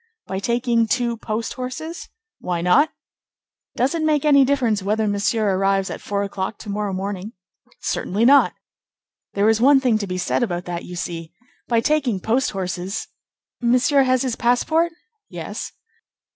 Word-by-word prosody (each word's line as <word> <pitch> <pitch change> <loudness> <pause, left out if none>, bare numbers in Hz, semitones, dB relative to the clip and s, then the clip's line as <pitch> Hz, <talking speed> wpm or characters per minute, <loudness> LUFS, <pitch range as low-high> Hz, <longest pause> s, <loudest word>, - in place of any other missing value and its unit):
"By 190 - -3
taking 235 +1 +1
two 240 0 0
post 225 0 -3
horses?" 265 +7 -6 0.3
"Why 175 -2 -2
not?" 230 - +4 0.9
"Does 260 +5 +1
it 335 - -1
make 305 -2 +1
any 280 -2 +6
difference 250 -6 +1
whether 215 +3 0
Monsieur 205 0 +1
arrives 195 0 +1
at - - -6
four 200 0 -2
o'clock 200 +1 -4
to 210 - -7
morrow 205 0 -2
morning?" 195 +2 -4 0.5
"Certainly 210 +5 0
not." 280 +2 +6 0.8
"There 200 +1 +3
is 225 0 +3
one 275 +2 +6
thing 245 -5 +2
to 200 - -3
be 185 0 -3
said 180 - 0
about 180 -6 -2
that, 175 -1 -5
you 180 - -8
see, 165 -2 -5 0.4
by 230 -1 +2
taking 265 -7 +1
post 235 +7 +1
horses—Monsieur 215 +8 -1
has 255 -1 +2
his 250 -3 -1
passport?" 315 +8 +2 0.4
"Yes." - - -6
225 Hz, 155 wpm, -22 LUFS, 195-255 Hz, 0.9 s, any